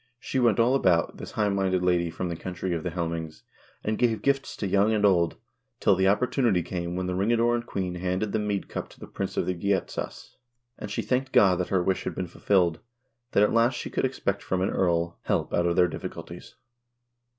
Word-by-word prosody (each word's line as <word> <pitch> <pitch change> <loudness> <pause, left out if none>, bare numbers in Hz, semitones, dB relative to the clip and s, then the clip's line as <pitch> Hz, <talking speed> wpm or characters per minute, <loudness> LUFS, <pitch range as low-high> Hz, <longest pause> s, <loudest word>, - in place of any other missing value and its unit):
She 130 - -2
went 120 -4 +3
all 120 +3 +4
about, 90 - +2
this - - -8
highminded 95 -3 +1
lady 90 -1 +2
from 90 +2 -4
the 85 - -3
country 90 +1 -4
of 85 - -2
the - - -3
Helmings, 80 -2 -4 0.4
and 110 0 -1
gave 115 -3 +1
gifts 140 -1 0
to - - -3
young 100 +3 +3
and 105 -1 +2
old, 85 -4 +3 0.4
till 100 - +4
the 95 +1 +1
oppor 100 +5 +3
tunity 115 - +1
came 85 -1 -4
when 90 0 -2
the 90 - -2
ring 100 +5 +1
adorned 120 0 +2
queen 90 -2 -3
handed 90 +3 -2
the 110 - 0
meadcup 105 -2 -3
to - - -18
the - - -8
prince - - -5
of - - +1
the 90 - 0
Geatas, 95 +2 -3 0.4
and 105 - -6
she 100 - -2
thanked 130 +1 -1
God 95 -3 +5
that 90 - -2
her 95 -2 +2
wish 95 +1 0
had - - -3
been 95 - -2
ful 85 - -15
filled, 90 -5 +3 0.5
that 100 - +5
at 105 - +2
last 115 +2 +3
she - - -5
could - - -1
expect 100 -6 -2
from 95 -1 -1
an 95 - 0
earl 85 -2 0
help - - 0
out 85 0 +2
of 85 - +1
their 90 0 +5
diffi - - -5
culties." - - -10
95 Hz, 225 wpm, -26 LUFS, 90-110 Hz, 0.5 s, God